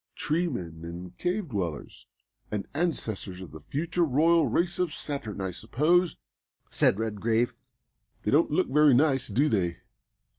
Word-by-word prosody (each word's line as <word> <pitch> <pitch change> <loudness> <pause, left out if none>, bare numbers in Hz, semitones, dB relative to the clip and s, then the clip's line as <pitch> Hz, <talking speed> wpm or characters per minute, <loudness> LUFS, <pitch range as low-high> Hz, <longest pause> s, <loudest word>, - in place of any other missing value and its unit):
"Tree 170 +4 0
men 85 - -5
and 85 +2 -8
cave 180 0 -1
dwellers, 90 - -4 0.4
and 105 -2 -3
ancestors 115 - -2
of 95 - -9
the 80 - -9
future 170 - -1
royal 160 +2 +4
race 170 +10 0
of 180 -3 +1
Saturn, 140 -11 -5
I 95 -1 -2
suppose!" 155 - +1 0.5
said - - +3
Redgrave. 110 +2 0 0.7
"They - - 0
don't 155 +4 +4
look 170 +5 +2
very 150 -1 +5
nice, 135 -1 +3
do 130 +8 +2
they? 90 - 0
130 Hz, 145 wpm, -28 LUFS, 100-160 Hz, 0.7 s, very